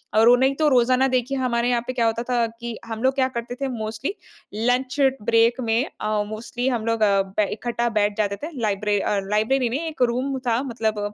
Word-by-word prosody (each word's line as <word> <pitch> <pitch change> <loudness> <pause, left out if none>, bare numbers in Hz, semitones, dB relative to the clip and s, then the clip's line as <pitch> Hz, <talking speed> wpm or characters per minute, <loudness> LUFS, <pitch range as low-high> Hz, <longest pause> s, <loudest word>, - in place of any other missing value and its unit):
और 225 +2 +6
उन्हें 260 +2 +4
तो 310 +1 +2
रोज़ाना 255 0 +3
देखिए 255 +1 0
हमारे 245 -2 0
यहाँ 240 -1 +1
पे 255 - -2
क्या 235 -2 +1
होता 225 +1 0
था 240 -2 +2
कि 235 -1 -5
हम 225 +1 -6
लोग 260 0 +3
क्या 260 -1 +2
करते 235 +1 -4
थे 275 - 0
मोस्टली 225 - -4 0.4
लंच 250 +5 0 0.2
ब्रेक 230 +3 +3
में 230 +4 +1 0.2
अ, 215 -1 0
मोस्टली 235 +3 -4
हम 235 -3 -2
लोग 230 0 0 0.4
बै 210 - +3
इकट्ठा 240 +1 -2
बैठ 205 +1 0
जाते 200 -2 0
थे। 330 - -4
लाइब्र 205 -1 0
अ, 205 - 0
लाइब्रेरी 235 +4 +1
में 260 +5 -2
एक 310 -5 -7
रूम 265 +2 -2
था 235 +1 +2
मतलब 225 -4 -2
235 Hz, 205 wpm, -23 LUFS, 220-255 Hz, 0.4 s, और